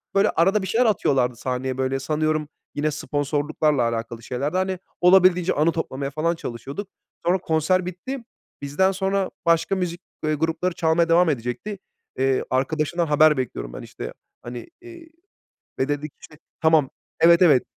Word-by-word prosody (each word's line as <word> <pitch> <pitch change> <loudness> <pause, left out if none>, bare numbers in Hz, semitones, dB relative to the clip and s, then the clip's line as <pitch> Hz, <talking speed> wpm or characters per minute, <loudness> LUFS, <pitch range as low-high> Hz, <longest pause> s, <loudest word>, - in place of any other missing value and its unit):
Böyle, 200 +2 +4
arada 195 +5 +2
bir 190 - -4
şeyler 230 +6 +2
atıyorlardı 135 - +2
sahneye, 130 +1 -3
böyle, 130 0 0
sanıyorum, 155 +2 0 0.3
yine 150 +1 0
sponsorluklarla 145 -1 0
alakalı 115 0 -5
şeylerdi, 140 +9 -2
hani. 185 -1 -1 0.2
Olabildiğince 180 -1 +5
anı 155 +3 +2
toplamaya, 140 -4 -3
falan, 160 +3 0
çalışıyorduk. 140 - -6 0.4
Sonra 180 +2 +3
konser 175 +2 +1
bitti. 185 +10 -5 0.4
Bizden 145 +7 +1
sonra 195 0 0 0.2
başka 170 +3 +3
müzik, 180 -1 -3 0.2
ııı, 155 - +1
grupları 165 +4 -1
çalmaya 165 0 +2
devam 170 +1 +5
edecekti. 140 - -3 0.4
Eee, 135 0 +1
arkadaşından 155 +6 0
haber 150 0 +5
bekliyorum - - -4
ben, - - -7
işte, - - -8 0.3
hani, 120 -1 -8
eee, 345 -2 -12 0.7
ve 130 - 0
dedik, 145 0 -3
işte, 155 - -14 0.2
"Tamam, 160 -4 +4 0.3
evet, 170 +2 +6
evet." 145 -8 +6
155 Hz, 150 wpm, -23 LUFS, 135-180 Hz, 0.7 s, evet